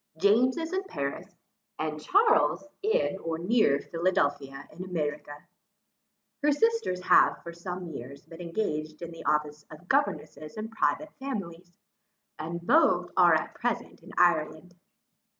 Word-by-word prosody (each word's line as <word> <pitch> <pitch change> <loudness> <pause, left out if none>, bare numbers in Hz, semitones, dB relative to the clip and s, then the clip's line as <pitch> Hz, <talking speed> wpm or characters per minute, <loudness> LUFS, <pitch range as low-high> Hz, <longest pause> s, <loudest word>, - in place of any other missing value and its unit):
James 230 - +4
is 325 +2 -3
in 380 - +1
Paris, 140 - -5 0.5
and 155 -1 -3
Charles 415 - +3 0.2
in 430 - +1
or 165 -2 -3
near 175 -5 +3
Philadelphia 145 -5 -1
in 175 +4 -8
America. 150 -4 -4 1.0
Her 295 0 +3
sisters 455 - +1
have - - +4
for 170 - -7
some 180 +1 -6
years 140 -4 -9
been 165 +1 -11
engaged 155 -3 -3
in 170 - -6
the 165 - -10
office 150 0 0
of 155 +4 -13
governesses 185 - -1
in 215 +1 -4
private 305 +7 -1
families, 185 -10 -6 0.7
and 170 +2 -4
are - - -14
both 325 - +4
at - - +4
present - - -3
in - - -13
Ireland. 165 0 +2
175 Hz, 135 wpm, -28 LUFS, 155-225 Hz, 1.0 s, James